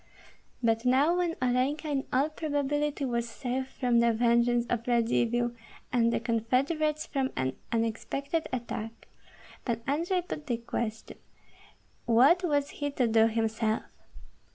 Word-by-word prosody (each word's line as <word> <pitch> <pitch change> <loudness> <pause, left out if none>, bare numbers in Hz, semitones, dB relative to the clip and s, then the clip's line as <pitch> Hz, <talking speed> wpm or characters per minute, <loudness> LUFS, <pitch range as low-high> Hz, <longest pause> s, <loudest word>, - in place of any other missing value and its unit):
But 225 0 +2
now 270 +7 +4
when 345 -2 0
Olenka 255 +5 +1
in 280 -2 -1
all 275 +4 +2
probability 295 -1 -1
was 235 -2 -1
safe 260 +2 -3
from 245 -3 +1
the 235 0 +4
vengeance 235 +1 +2
of 235 0 -2
Radzivill, 240 0 +2 0.4
and 235 -1 +3
the - - 0
confederates 265 +7 0
from 270 -2 -1
an 130 0 -1 0.2
unexpected 240 +7 -1
attack. 230 -2 -5 0.6
Pan 230 -2 -2
Andrei 340 +6 0
put 305 -4 -7
the 240 -3 0
question, 230 -1 -5 0.9
What 260 +10 +5
was 290 -4 +1
he 290 - 0
to 260 -4 +1
do 225 0 +5
himself? 225 0 0
245 Hz, 130 wpm, -29 LUFS, 230-285 Hz, 0.9 s, What